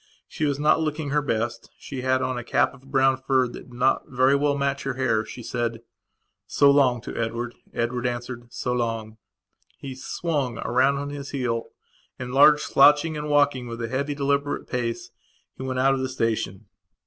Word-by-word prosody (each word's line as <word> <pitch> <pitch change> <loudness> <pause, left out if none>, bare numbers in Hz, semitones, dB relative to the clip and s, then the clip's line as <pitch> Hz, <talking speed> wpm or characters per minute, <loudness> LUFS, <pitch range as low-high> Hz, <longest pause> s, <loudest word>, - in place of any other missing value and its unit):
She 155 - -3
was 145 -1 0
not 150 +2 +3
looking 155 -2 -2
her 150 +1 +2
best; 115 -4 -2
she 135 -3 -7
had 130 0 +1
on 130 - -1
a 120 - -4
cap 120 - +1
of 135 0 -17
brown 135 -1 +3
fur 130 -1 +1
that 120 - -11 0.2
did - - -15
not 125 +2 +1
very 130 +2 +3
well 145 0 +1
match 140 0 -1
her 135 -2 -3
hair. 120 -4 +1
She 120 +2 -9
said: 115 -1 -3 0.6
"So 140 0 +5
long," 130 -4 +3
to - - -7
Edward. 115 +1 -3 0.2
Edward 120 +1 -1
answered: 120 0 -5
"So 125 - -2
long." 115 -2 -3 0.6
He 135 -1 -7
swung 130 -1 -2
round 130 +3 +2
on 145 +1 -4
his 140 -1 -6
heel 120 -4 -2 0.5
and, 125 0 -6
large, 150 +2 +7
slouching, 150 +3 +5
and 150 0 -4
walking 145 -4 +2
with 115 0 -6
a 115 -1 -3
heavy 140 +3 -2
deliberate 140 0 -1
pace, 120 -2 -3 0.4
he - - -10
went 130 -1 -3
out 135 +1 +4
of 135 - -1
the 130 0 -2
station. 110 -5 -2
130 Hz, 190 wpm, -24 LUFS, 120-140 Hz, 0.6 s, large